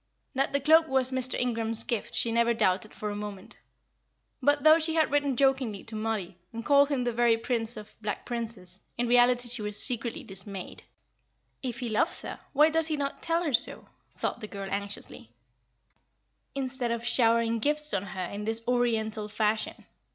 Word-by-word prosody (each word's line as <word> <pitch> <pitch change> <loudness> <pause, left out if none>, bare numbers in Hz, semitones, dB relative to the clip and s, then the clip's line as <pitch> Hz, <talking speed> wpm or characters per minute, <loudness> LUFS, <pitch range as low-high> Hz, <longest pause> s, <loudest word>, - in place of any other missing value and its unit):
That 270 0 +1
the 280 - +1
cloak 320 +3 +5
was 265 -2 +2
Mr. 260 -1 0
Ingram's 230 -2 +1
gift 235 -4 -3
she 230 - +1
never 235 0 +2
doubted 185 0 +1
for 210 -1 -5
a - - -5
moment; 205 -2 -8 0.8
but 290 +2 +2
though 315 +1 +7
she 320 0 -1
had 315 -4 +2
written 285 -3 +1
jokingly 265 -6 +1
to 230 - -9
Mollie, 215 -5 -3
and 230 0 -7
called 285 0 +5
him 275 -4 0
the 240 -1 -1
very 235 -1 +3
Prince 230 -1 -2
of 215 0 -10
Black 210 -1 -4
Princes, 220 -6 -5 0.2
in 240 0 0
reality 245 0 +4
she 240 -1 +3
was 210 0 -2
secretly 235 -2 +1
dismayed. 195 0 -7 0.8
"If 250 -1 -4
he 245 - -2
loves 215 - +1
her, - - -6
why 300 +2 +5
does 325 0 +1
he 310 -2 0
not 280 -1 -3
tell 335 +1 0
her 300 -5 -1
so?" 230 - +1 0.3
thought - - -3
the 215 - -5
girl, 200 -1 -6
anxiously, 200 - -6 1.2
"instead 260 -2 -2
of 235 0 -3
showering 230 -1 +3
gifts 300 +4 0
on - - +1
her 185 -1 -5
in 205 +3 -6
this 225 +1 -2
Oriental 225 -3 0
fashion. 215 0 -1
235 Hz, 180 wpm, -28 LUFS, 215-265 Hz, 1.2 s, though